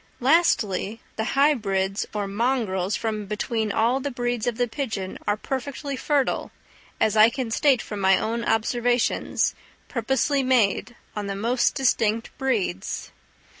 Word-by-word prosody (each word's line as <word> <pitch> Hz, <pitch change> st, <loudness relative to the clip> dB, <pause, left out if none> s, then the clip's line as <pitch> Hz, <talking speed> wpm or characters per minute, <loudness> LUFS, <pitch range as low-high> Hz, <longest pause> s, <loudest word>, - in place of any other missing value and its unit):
Lastly, 235 Hz, -, +2 dB, 0.2 s
the 220 Hz, -, -1 dB
hybrids 200 Hz, -9 st, +2 dB
or 210 Hz, -1 st, -2 dB
mongrels 205 Hz, -3 st, 0 dB
from 215 Hz, -2 st, -3 dB
between 215 Hz, +1 st, -1 dB
all 235 Hz, +5 st, +2 dB
the 285 Hz, -, -3 dB
breeds 245 Hz, -3 st, -2 dB
of 235 Hz, -2 st, -1 dB
the 245 Hz, -, +1 dB
pigeon 220 Hz, -7 st, -4 dB
are 205 Hz, -, +2 dB
perfectly 275 Hz, +3 st, -4 dB
fertile, 280 Hz, 0 st, 0 dB, 0.5 s
as 220 Hz, -, +2 dB
I 215 Hz, +1 st, +7 dB
can 240 Hz, -1 st, -4 dB
state 265 Hz, 0 st, +3 dB
from 210 Hz, -, -6 dB
my 190 Hz, 0 st, +5 dB
own 230 Hz, +1 st, -2 dB
observations, 240 Hz, +2 st, +1 dB, 0.4 s
purposely 265 Hz, +3 st, +1 dB
made, 245 Hz, -2 st, +2 dB, 0.2 s
on 210 Hz, -1 st, -3 dB
the 195 Hz, -, -3 dB
most 235 Hz, +5 st, +1 dB
distinct 230 Hz, -4 st, +1 dB
breeds. 215 Hz, -, -2 dB
230 Hz, 135 wpm, -24 LUFS, 210-260 Hz, 0.5 s, I